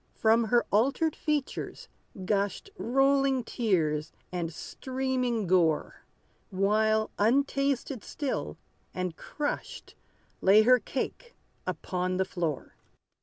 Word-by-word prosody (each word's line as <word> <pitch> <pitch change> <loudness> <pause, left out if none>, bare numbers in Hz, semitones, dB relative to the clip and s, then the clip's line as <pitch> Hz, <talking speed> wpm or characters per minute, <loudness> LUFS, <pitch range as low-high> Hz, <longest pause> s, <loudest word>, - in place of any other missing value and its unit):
From 225 +1 +3
her 235 +2 +3
altered 275 - +2
features 300 -3 -3 0.4
gushed 200 - -1
Rolling 270 - +2
tears, 165 - 0 0.2
and 175 -2 -3
streaming 255 - -2
gore; 170 -4 +1 0.4
While, 215 +3 +2
untasted 275 +2 +1
still, 285 -3 -3 0.4
and 185 -2 -2
crushed, 295 -1 -5 0.5
Lay 205 +3 +6
her 250 +2 +6
cake 470 - -5 0.3
upon 185 0 -2
the 190 - +1
floor. 170 -6 -3
220 Hz, 95 wpm, -29 LUFS, 185-265 Hz, 0.5 s, Lay